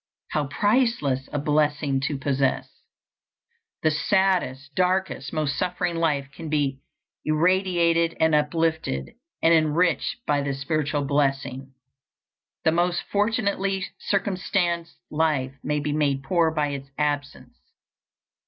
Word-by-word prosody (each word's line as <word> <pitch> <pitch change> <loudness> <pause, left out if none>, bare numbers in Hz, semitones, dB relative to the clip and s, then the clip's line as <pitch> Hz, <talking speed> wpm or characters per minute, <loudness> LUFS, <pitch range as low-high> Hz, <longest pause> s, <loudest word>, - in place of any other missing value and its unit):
How 150 -2 0
priceless 205 - +1
a - - -2
blessing 145 -1 +1
to 145 - -2
possess! 135 -1 0 1.2
The 155 - +4
saddest, 155 -6 +1
darkest, 185 -4 0
most 150 -3 -1
suffering 180 -1 -1
life 145 -5 0
can 160 +2 -7
be 140 -3 0 0.4
irradiated 170 0 +2
and 160 0 +3
uplifted 150 - 0 0.3
and 165 - +6
enriched 165 - +1
by 145 -1 +1
this 140 -1 -3
spiritual 145 0 -1
blessing. 135 -1 -1 0.9
The 160 - +4
most 175 +1 +1
fortunately 200 -3 0
circumstanced 180 -3 -1
life 150 -4 +1
may 150 +1 0
be 145 0 -2
made 140 -3 +1
poor 165 +3 +2
by 150 -2 0
its 140 -1 -6
absence. 145 -1 -3
155 Hz, 115 wpm, -25 LUFS, 140-175 Hz, 1.2 s, and